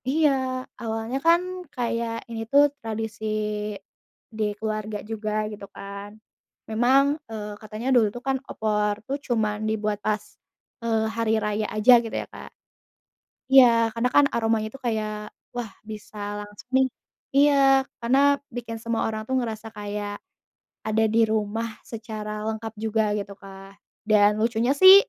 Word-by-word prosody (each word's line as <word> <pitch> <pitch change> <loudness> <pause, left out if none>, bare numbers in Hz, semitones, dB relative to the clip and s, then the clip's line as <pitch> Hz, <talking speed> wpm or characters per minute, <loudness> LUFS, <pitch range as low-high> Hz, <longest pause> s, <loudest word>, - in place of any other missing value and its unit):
Iya, 265 -4 +1 0.2
awalnya 225 +2 -2
kan 335 +1 +6 0.3
kayak 230 -1 -2
ini 225 -1 -4
tuh 285 +1 +7 0.2
tradisi 220 -1 -4 1.1
di 220 - 0
keluarga 215 0 -3
juga, 215 -1 -3 0.2
gitu 205 -1 -8
kan, 200 +1 -7 0.6
memang, 245 +5 +4 0.3
eee, 210 -2 -5
katanya 215 +3 -6
dulu 230 -3 +5
tuh 245 - -7
kan 270 0 +2
opor 210 -1 0
tuh 275 - -1
cuman 215 -3 +1
dibuat 210 -1 -1
pas, 215 -1 +2 0.7
eee, 225 -1 +1
hari 230 -1 +1
raya 210 0 0
aja 215 +4 +7
gitu 225 - -5
ya, - - -7
Kak. - - -9 1.0
Iya, 265 -2 +10 0.3
karena 235 +2 +1
kan 290 - +7
aromanya 225 -1 +1
itu 270 - -11
kayak, 215 -2 -1 0.4
wah, 240 -2 -3 0.2
bisa 215 0 -9 0.2
langsung 205 +3 -12
nih. 265 0 +4 0.5
Iya, 290 +1 +6 0.5
karena 245 +4 +3 0.4
bikin 230 -2 -5
semua 230 -1 -1
orang 220 -1 -3
tuh 260 - +1
ngerasa 225 -3 -3
kayak 205 0 -4 0.7
ada 220 +1 +2
di 230 - +5
rumah 220 +1 -1 0.2
secara 220 -2 -6 0.2
lengkap 220 0 -5
juga 220 0 +2 0.2
gitu, 200 0 -5
Kak, 195 0 -12 0.3
dan 205 -1 +6
lucunya 235 +3 +2
sih, 375 +6 +10
220 Hz, 140 wpm, -25 LUFS, 210-240 Hz, 1.1 s, Iya